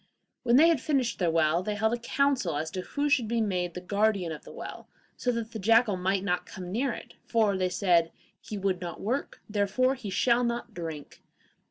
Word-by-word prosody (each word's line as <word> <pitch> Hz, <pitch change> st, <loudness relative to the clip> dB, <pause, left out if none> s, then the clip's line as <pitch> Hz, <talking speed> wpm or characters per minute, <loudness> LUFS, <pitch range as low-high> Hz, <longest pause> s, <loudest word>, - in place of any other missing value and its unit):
When 240 Hz, -1 st, +3 dB
they 310 Hz, +5 st, +7 dB
had 320 Hz, -7 st, +2 dB
finished 270 Hz, -6 st, 0 dB
their 175 Hz, -3 st, +2 dB
well, 165 Hz, +1 st, +2 dB
they 210 Hz, +2 st, -2 dB
held 220 Hz, +2 st, +1 dB
a 240 Hz, -, -1 dB
council 255 Hz, -, +1 dB
as 160 Hz, +1 st, -3 dB
to 185 Hz, -, -3 dB
who 285 Hz, +9 st, -2 dB
should 275 Hz, -6 st, +2 dB
be 235 Hz, +1 st, 0 dB
made 180 Hz, -5 st, -1 dB
the 180 Hz, -, -5 dB
guardian 200 Hz, -2 st, +1 dB
of 155 Hz, -, -7 dB
the -, -, -11 dB
well, -, -, -8 dB, 0.3 s
so 250 Hz, -, 0 dB
that 230 Hz, -1 st, -4 dB
the 220 Hz, -, -5 dB
jackal 225 Hz, +1 st, +4 dB
might 190 Hz, +1 st, 0 dB
not 180 Hz, -2 st, -1 dB
come 180 Hz, -1 st, -8 dB
near 245 Hz, +6 st, 0 dB
it, -, -, -8 dB
for, 220 Hz, -4 st, +2 dB
they 185 Hz, -1 st, 0 dB
said, 175 Hz, -3 st, +2 dB, 0.3 s
'he 210 Hz, -, -7 dB
would 190 Hz, -2 st, -1 dB
not 175 Hz, -1 st, -5 dB
work, 250 Hz, +7 st, -3 dB
therefore 210 Hz, +5 st, +1 dB
he 245 Hz, -6 st, -6 dB
shall 235 Hz, +5 st, +2 dB
not 235 Hz, -1 st, -2 dB
drink. 160 Hz, -5 st, -7 dB
205 Hz, 215 wpm, -28 LUFS, 180-235 Hz, 0.3 s, they